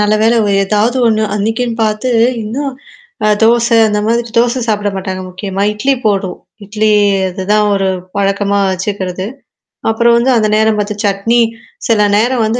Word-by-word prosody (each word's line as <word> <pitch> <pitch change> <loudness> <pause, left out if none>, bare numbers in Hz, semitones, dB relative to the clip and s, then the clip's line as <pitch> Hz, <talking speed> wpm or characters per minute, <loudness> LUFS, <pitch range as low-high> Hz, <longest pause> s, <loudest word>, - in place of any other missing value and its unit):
நல்ல 210 0 +2
வேல 230 +2 +3 0.3
ஏதாவது 215 +5 +1
ஒண்ணு 220 -1 +2
அன்னைக்குன்னு 225 +3 -1
பார்த்து, 215 +4 -1 0.3
இன்னும் 270 +6 -3 0.6
அ - - +3
தோசை 235 +1 +3
அந்த 210 0 -1
மாதிரி 235 +1 0
தோசை 240 +2 +1
சாப்பிட 205 -1 0
மாட்டாங்க 185 -1 -4
முக்கியமா, 195 +1 -4
இட்லி 265 +6 0
போதும். 195 -3 -1 0.3
இட்லி 215 +2 -1 0.4
அதுதான் 205 +3 0
ஒரு 195 -1 0 0.3
பழக்கமா 200 0 0
வச்சுக்கிறது. 185 -1 -3 0.6
அப்புறம் 235 +1 +3
வந்து 255 +2 +2
அந்த 215 -2 +2
நேரம் 220 0 +2
பார்த்து 210 0 -2
சட்னி, 205 +4 +1 0.5
சில 215 -3 +3
நேரம் 240 +1 +1
வந்து 230 +3 -1
215 Hz, 150 wpm, -13 LUFS, 200-230 Hz, 0.6 s, வேல